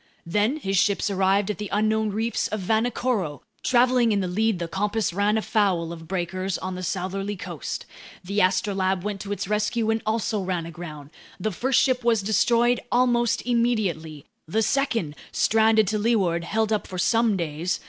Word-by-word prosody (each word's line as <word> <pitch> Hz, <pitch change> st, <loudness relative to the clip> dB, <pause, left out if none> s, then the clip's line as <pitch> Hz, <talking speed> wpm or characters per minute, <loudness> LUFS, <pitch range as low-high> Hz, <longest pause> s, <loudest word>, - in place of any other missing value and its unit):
Then 210 Hz, -, +1 dB
his 195 Hz, -10 st, -1 dB
ships 205 Hz, +1 st, +1 dB
arrived 195 Hz, +1 st, +2 dB
at 210 Hz, -, -7 dB
the 210 Hz, -2 st, -4 dB
unknown 215 Hz, +1 st, +1 dB
reefs 225 Hz, +3 st, -1 dB
of 215 Hz, -, -3 dB
Vanikoro. 220 Hz, -, 0 dB, 0.2 s
Traveling 245 Hz, -1 st, +3 dB
in 205 Hz, -, +2 dB
the 185 Hz, -, -1 dB
lead, 215 Hz, +3 st, +1 dB
the 170 Hz, -1 st, -3 dB
Compass 205 Hz, +3 st, -1 dB
ran 205 Hz, +3 st, +2 dB
afoul 195 Hz, -7 st, 0 dB
of 165 Hz, -1 st, -11 dB
breakers 185 Hz, +1 st, -2 dB
on 185 Hz, 0 st, -5 dB
the 180 Hz, -, -5 dB
southerly 195 Hz, +3 st, -3 dB
coast. 175 Hz, -6 st, -6 dB, 0.4 s
The 200 Hz, +3 st, -2 dB
Astrolabe 190 Hz, 0 st, +1 dB
went 205 Hz, -2 st, -3 dB
to 200 Hz, -, -6 dB
its 205 Hz, -, -3 dB
rescue 215 Hz, +2 st, 0 dB
and 225 Hz, 0 st, 0 dB
also 220 Hz, -1 st, -1 dB
ran 180 Hz, -3 st, -2 dB
aground. 155 Hz, -4 st, -9 dB, 0.3 s
The 215 Hz, +4 st, -1 dB
first 255 Hz, +8 st, +1 dB
ship 255 Hz, -2 st, +2 dB
was 230 Hz, -3 st, +2 dB
destroyed 235 Hz, +4 st, +3 dB
almost 240 Hz, -2 st, +2 dB
immediately. 200 Hz, -, 0 dB, 0.2 s
The 220 Hz, +7 st, +1 dB
second, 230 Hz, -, 0 dB, 0.2 s
stranded 220 Hz, 0 st, +3 dB
to 215 Hz, 0 st, 0 dB
leeward, 190 Hz, -7 st, +1 dB
held 220 Hz, +3 st, 0 dB
up 215 Hz, -, -1 dB
for 185 Hz, -, -7 dB
some 225 Hz, +2 st, +2 dB
days. 165 Hz, +1 st, -2 dB
205 Hz, 170 wpm, -24 LUFS, 185-225 Hz, 0.4 s, Traveling